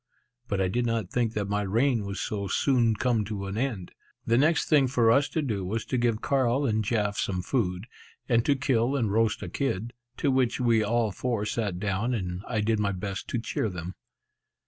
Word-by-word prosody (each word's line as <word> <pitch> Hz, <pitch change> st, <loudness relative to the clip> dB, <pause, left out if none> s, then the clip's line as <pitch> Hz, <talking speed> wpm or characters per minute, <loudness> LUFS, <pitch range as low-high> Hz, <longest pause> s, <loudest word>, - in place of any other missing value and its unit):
But 100 Hz, -4 st, -1 dB
I 95 Hz, -, +2 dB
did 120 Hz, +6 st, 0 dB
not 115 Hz, -5 st, -2 dB
think 120 Hz, -2 st, 0 dB
that 105 Hz, -2 st, -2 dB
my 105 Hz, 0 st, 0 dB
reign 115 Hz, +2 st, +1 dB
was 100 Hz, 0 st, -4 dB
so 100 Hz, -2 st, -3 dB
soon 120 Hz, -1 st, +2 dB
to -, -, -13 dB
come 120 Hz, -4 st, +2 dB
to 100 Hz, -1 st, -4 dB
an 95 Hz, +1 st, -4 dB
end. 115 Hz, -7 st, -2 dB, 0.3 s
The 115 Hz, -, +2 dB
next 155 Hz, +7 st, +3 dB
thing 145 Hz, -4 st, +4 dB
for 120 Hz, -3 st, +3 dB
us 140 Hz, +4 st, +3 dB
to 155 Hz, +1 st, -1 dB
do 105 Hz, -8 st, -2 dB
was 110 Hz, +5 st, -3 dB
to 130 Hz, -, -1 dB
give 115 Hz, -2 st, +1 dB
Carl 135 Hz, 0 st, +2 dB
and 110 Hz, -3 st, +1 dB
Jaf 105 Hz, -2 st, 0 dB
some 90 Hz, -2 st, -1 dB
food, 90 Hz, -5 st, -1 dB, 0.4 s
and 115 Hz, -2 st, +3 dB
to 145 Hz, -, +3 dB
kill 130 Hz, 0 st, +1 dB
and 115 Hz, -7 st, 0 dB
roast 110 Hz, 0 st, +1 dB
a -, -, -4 dB
kid, 120 Hz, -4 st, -2 dB, 0.2 s
to 140 Hz, -, +1 dB
which 130 Hz, -2 st, +1 dB
we 115 Hz, -3 st, +3 dB
all 115 Hz, 0 st, +1 dB
four 115 Hz, +1 st, -2 dB
sat 105 Hz, -5 st, -2 dB
down, 105 Hz, +5 st, -1 dB
and 90 Hz, -3 st, -3 dB
I 110 Hz, -3 st, 0 dB
did 110 Hz, 0 st, +1 dB
my 100 Hz, -1 st, +1 dB
best 100 Hz, +1 st, -5 dB
to -, -, -2 dB
cheer 115 Hz, -1 st, -2 dB
them. 90 Hz, -1 st, -6 dB
115 Hz, 215 wpm, -27 LUFS, 100-125 Hz, 0.4 s, thing